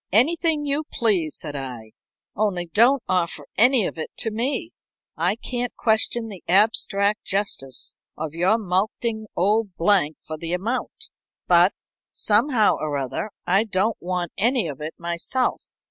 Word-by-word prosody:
"Anything 305 - +4
you 285 +2 0
please," 190 - +1
said 150 -2 -5
I. 125 -5 -7 0.4
"Only 195 -5 0
don't 235 +9 +4
offer 170 -5 -1
any 245 0 +5
of 165 - -5
it 155 - -4
to 225 - -1
me. 265 +9 -2 0.4
I 175 +5 +1
can't 245 +1 -4
question 225 +1 +1
the 200 -5 -10
abstract 205 +1 +2
justice 185 -10 -3 0.2
of 155 -1 -5
your 180 +6 +2
mulcting 220 +3 -1
old 205 +1 +1
Blank 170 -4 +2
for 155 -1 -7
the 165 +1 -4
amount, 235 - -3 0.4
but, - - +5 0.4
somehow 220 +1 +3
or 150 -2 -2
other, 135 - -3 0.2
I 195 +4 +3
don't 215 +1 0
want 180 -1 -3
any 240 +1 +2
of 145 -2 -7
it 155 +1 -5
myself. 170 +9 -2
200 Hz, 145 wpm, -23 LUFS, 170-230 Hz, 0.4 s, any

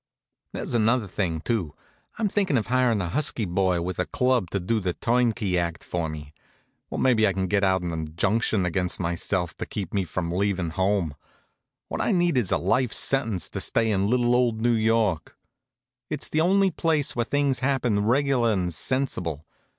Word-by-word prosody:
There's - - -4
another 115 0 +2
thing, 90 -5 -2
too. 90 -8 -2 0.4
I'm 225 -2 +1
thinkin' 195 -8 +1
of 110 - 0
hirin' 125 -5 +2
a 85 - -3
husky 125 - 0
boy 90 -1 +1
with 90 +1 -4
a 90 - 0
club 125 -7 +1
to 100 - -1
do 110 +5 0
the 90 -3 -2
turnkey 115 -6 +1
act 85 -1 -3
for 85 -2 -3
me. 75 -1 -8 0.6
Or - - -4
maybe 115 -5 +3
I 100 - +1
could 95 0 -2
get 100 -1 +2
out 95 -1 +2
an 85 - -2
injunction 90 +6 0
against 90 0 -1
myself 85 +1 -2
to - - -4
keep 100 -5 -5
me 100 -2 0
from 85 0 -3
leavin' 90 -2 0
home. 95 -3 0 0.7
What - - -3
I - - +1
need 175 -3 +2
is 120 -8 +1
a - - +3
life 120 +7 +1
sentence 115 - 0
to - - -5
stay 115 -1 +1
in 100 0 +1
little 120 0 +2
old 120 -3 +2
New 120 +1 +2
York. 110 -6 +1 0.7
It's 150 -1 -3
the 155 - +1
only 190 +3 +3
place 160 -3 0
where 120 - +1
things 140 0 0
happen 125 -6 +1
reg'lar 125 0 +2
and 90 -4 -1
sensible. 85 - -2
105 Hz, 185 wpm, -25 LUFS, 90-125 Hz, 0.7 s, maybe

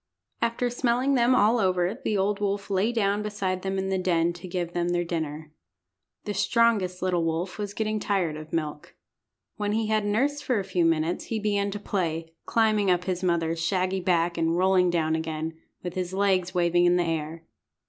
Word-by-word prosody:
After 235 +1 0
smelling 245 +2 +1
them 250 0 +4
all 230 +1 +4
over 185 -1 +1
the 210 - 0
old 200 +1 0
wolf 200 0 -2
lay 195 +4 +2
down 205 -3 +1
beside 195 -3 -2
them 195 0 -2
in 190 0 -1
the 190 -1 0
den 170 -2 +1
to 175 +2 -9
give 175 -1 -3
them 175 0 0
their 175 0 +1
dinner. 155 -2 -4 0.7
The 210 - -2
strongest 205 -4 +2
little 180 -2 +1
wolf 165 +5 -2
was 205 -1 -4
getting 215 -1 -1
tired 190 -7 0
of 155 0 -9
milk. 150 -2 -4 0.6
When 205 -1 -1
he 220 0 0
had 215 -1 +2
nursed 270 +8 0
for 250 - +1
a - - -2
few 180 -3 0
minutes 165 +1 +1
he 225 - -2
began 205 -1 0
to 205 +1 -5
play, 165 -5 -2
climbing 215 -3 +2
up 180 -1 +2
his 185 -1 -2
mother's 165 -2 0
shaggy 185 +2 0
back 175 -2 +1
and 165 +1 +1
rolling 185 -1 +4
down 160 -2 +1
again, 160 0 -3 0.3
with 180 -1 -4
his 185 0 -3
legs 190 -2 +2
waving 175 -1 +2
in 175 0 +4
the 175 - +2
air. 165 0 -3
185 Hz, 195 wpm, -26 LUFS, 170-205 Hz, 0.7 s, them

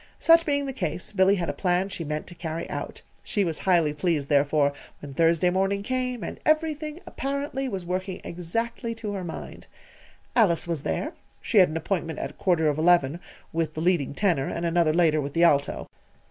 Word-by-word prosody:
Such 330 0 +5
being 285 -1 +1
the 270 - -4
case, 180 - -3
Billy 195 -1 +4
had 175 -3 -2
a - - -1
plan 180 0 +1
she 175 - -5
meant 150 0 -3
to 175 - -11
carry 165 -1 -5
out. - - -6 0.2
She 205 - 0
was 165 -4 -2
highly 165 -5 +4
pleased, 150 -2 -1
therefore, 145 0 +3 0.3
when 145 -2 -9
Thursday 165 +3 +3
morning 195 +2 0
came, 250 -2 -2
and - - -6
everything, 310 0 0
apparently, 275 -2 -3
was 190 -5 -4
working 185 +1 -3
exactly 230 +7 -3
to 215 -2 -5
her 195 -2 -4
mind. 170 - -8 0.7
Alice 180 -8 +3
was 165 -4 -2
there. - - -2 0.3
She 220 - +2
had 185 - +6
an 155 - -3
appointment 165 -2 -2
at - - -6
quarter 175 -5 +2
of 150 0 +1
eleven 165 -2 +3 0.3
with 160 -2 -1
the 155 - -3
leading 165 -6 +1
tenor, 170 -9 +1
and 170 - -3
another 170 -1 +3
later 155 -2 +3
with 140 0 -5
the 170 - +3
alto. 145 -4 +2
175 Hz, 190 wpm, -26 LUFS, 160-205 Hz, 0.7 s, had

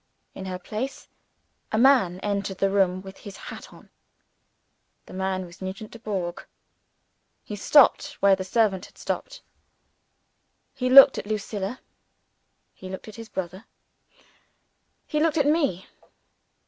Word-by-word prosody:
In 190 - -8
her 185 -1 -4
place, 220 +8 -6 0.6
a 220 - 0
man 235 -8 +4
entered 200 -2 -2
the 195 0 +1
room 185 -2 +1
with 190 0 -11
his 200 -1 -10
hat - - -10
on. - - -17 1.1
The - - -13
man 190 0 -2
was 175 +2 -15
Nugent 195 +3 -6
Dubourg. 195 -7 -4 1.0
He 210 - -7
stopped 285 +5 +4
where 200 -5 +4
the 190 - -5
servant 195 -1 +1
had - - -24
stopped. - - -5 1.3
He 255 -1 -2
looked 270 +1 +9
at - - -8
Lucilla; 210 +1 -4 0.9
he 185 - -10
looked 190 +3 -8
at 210 - -11
his 225 -1 -9
brother; 190 +1 -6 1.4
he 300 - -2
looked 325 +1 +1
at 290 - +3
me. 285 - +1
200 Hz, 135 wpm, -25 LUFS, 190-245 Hz, 1.4 s, looked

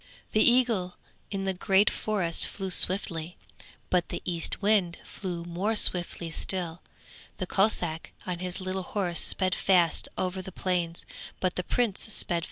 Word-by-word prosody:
The 215 - +3
eagle 230 -8 +3 0.3
in 195 -1 -3
the 190 - 0
great 195 +2 +3
forest 190 -6 +2
flew 190 -2 -4
swiftly, 175 -3 +1 0.5
but 180 -2 +2
the - - -5
Eastwind 180 +1 +1
flew 175 -4 -5
more 185 +6 -1
swiftly 175 -4 +2
still. 175 -1 -1 0.6
The 185 - -2
Kossack 180 -5 +1
on 180 -2 -3
his 180 +1 -4
little 185 0 -3
horse 180 -2 -2
sped 185 -1 0
fast 180 -2 +3
over 185 0 -1
the 190 - -8
plains, 175 -2 -2 0.3
but 185 -1 0
the - - 0
Prince 225 -1 0
sped - - +1
faster - - +1
still. 170 -1 +1
185 Hz, 155 wpm, -28 LUFS, 175-195 Hz, 0.6 s, The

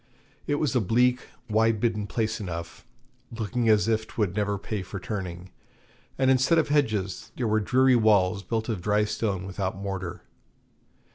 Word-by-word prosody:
It 145 - +1
was 145 -4 0
a 125 - +3
bleak 125 +5 +2 0.2
wide 110 0 +2
bitten 105 -2 0
place 110 0 -1
enough, 85 -5 -7 0.4
looking 115 +1 -1
as 105 0 +4
if 110 -1 0
'twould 100 -5 -2
never 105 -1 0
pay 100 +1 -4
for 95 +1 -7
turning, 90 -3 -6 0.7
and 130 -1 +3
instead 130 +6 +3
of 160 - +2
hedges 110 -10 0
there 120 - -1
were 110 0 +2
dreary 130 +4 +4
walls 105 -4 +3
built 110 +4 -2
of 110 -7 -2
dry 105 +2 +2
stone 105 -3 -2
without 95 0 -3
mortar. 95 -3 -5
110 Hz, 160 wpm, -26 LUFS, 95-115 Hz, 0.7 s, as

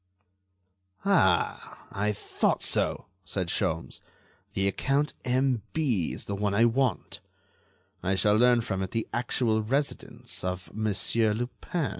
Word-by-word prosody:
"Ah! 165 - +2
I 105 +2 0
thought 105 - 0
so!" - - +1 0.2
said 90 -3 -3
Sholmes; 80 +1 -2 0.5
"the 95 0 +1
account 135 +9 +1
M.B. 125 - 0
is - - -6
the 100 - -4
one 100 0 0
I 115 +3 +5
want. 120 -3 0 0.8
I 95 +1 +1
shall 105 +2 +3
learn 120 +1 +5
from 95 -4 -3
it 95 - -2
the 115 +1 -2
actual 120 -2 +1
residence 135 +7 -2
of 90 0 -4
Monsieur 110 +1 +1
Lupin." 130 +6 -3
110 Hz, 125 wpm, -28 LUFS, 100-125 Hz, 0.8 s, I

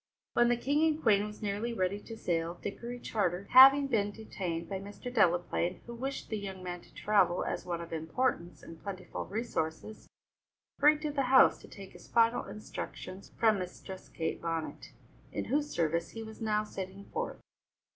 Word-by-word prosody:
When 240 0 +4
the 240 - +3
King 285 +5 +1
and 310 -1 0
Queen 210 -7 +3
was 210 +1 -10
nearly 210 +4 -1
ready 190 0 0
to 225 +2 -9
sail, 170 -4 -1
Dickory 235 +6 -6
Charter, 195 -5 -1
having 270 +2 +9
been 220 -6 +1
detained 185 -6 -5
by 195 +1 -3
Mr. 205 +5 -8
Delaplaine, 175 -3 +2
who 235 - -8
wished 265 +3 -4
the 215 - -2
young 190 -2 -7
man 180 -1 -5
to - - -20
travel 195 -4 +2
as - - -3
one 170 -1 -2
of 170 0 -8
importance 170 +2 -1
and 165 -1 -11
plentiful 190 -2 -6
resources, 215 -2 -4 0.7
hurried 300 +1 +5
to 300 - -1
the 285 -1 0
house 260 0 +6
to - - -14
take 195 -2 -11
his - - -14
final 230 0 +3
instructions 200 -2 -7
from 220 -3 +4
Mistress 185 +1 -8
Kate 160 - -3
Bonnet, 165 -1 -4 0.4
in - - -3
whose 295 +1 0
service 170 - 0
he 225 - -7
was 220 0 -10
now 215 -1 +1
setting 195 -1 -7
forth. 470 +2 -3
205 Hz, 175 wpm, -31 LUFS, 180-235 Hz, 0.7 s, having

